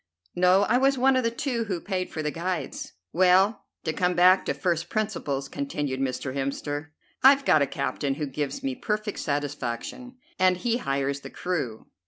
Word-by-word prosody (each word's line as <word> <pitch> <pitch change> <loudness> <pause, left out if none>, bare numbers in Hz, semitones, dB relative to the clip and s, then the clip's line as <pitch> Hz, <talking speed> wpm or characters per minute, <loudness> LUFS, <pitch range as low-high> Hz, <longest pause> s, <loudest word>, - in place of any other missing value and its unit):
"No, 180 +2 +5
I 245 - +3
was 270 +1 +3
one 265 +1 +4
of 255 - +2
the 230 - +2
two 235 0 -2
who 190 -5 -2
paid 185 0 -3
for 155 - -4
the 150 - -1
guides." 170 -4 -4 0.2
"Well, 185 +4 +4 0.2
to 160 - -1
come 180 +1 +1
back 185 +2 +5
to - - 0
first 170 -2 -1
principles," 170 -11 -2
continued 140 -1 -3
Mr. 130 0 -2
Hemster, 145 +2 -3 0.3
"I've 275 +1 +6
got 155 - +5
a 140 - +3
captain 140 0 -2
who 150 +1 -2
gives 145 - -4
me 270 -1 -1
perfect 215 -4 -3
satisfaction, 145 - -3 0.2
and 185 -1 +4
he 235 +5 0
hires 140 - -1
the - - -9
crew. 150 -12 -3
175 Hz, 180 wpm, -26 LUFS, 140-215 Hz, 0.3 s, I've